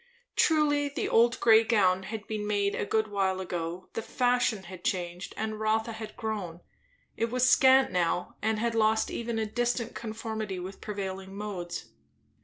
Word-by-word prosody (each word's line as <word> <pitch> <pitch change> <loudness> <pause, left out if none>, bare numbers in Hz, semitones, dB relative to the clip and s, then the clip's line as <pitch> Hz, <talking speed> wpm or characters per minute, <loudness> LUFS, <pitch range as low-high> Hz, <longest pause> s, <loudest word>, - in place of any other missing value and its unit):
Truly, 290 -3 +3
the 280 - -2
old 235 +1 +4
grey 225 -1 +6
gown 190 -5 +3
had 215 +2 -6
been 210 -1 -4
made 200 -1 +1
a - - -2
good 220 -1 +1
while 190 -2 0
ago; 175 -1 -4
the - - -2
fashion 245 -4 +1
had 180 0 -10
changed, 175 -1 -2
and 215 0 -3
Rotha 220 +1 +1
had 220 -1 -8
grown; 200 -6 -4 0.5
it 230 - -1
was 255 +1 +2
scant 265 +1 +6
now 175 0 0
and 220 0 +1
had 230 +1 0
lost 220 0 +2
even 235 -1 -3
a 220 - 0
distant 240 +1 -1
conformity 220 -3 -4
with 185 +2 -7
prevailing 195 -2 -5
modes. 190 -5 -5
215 Hz, 165 wpm, -29 LUFS, 190-230 Hz, 0.5 s, grey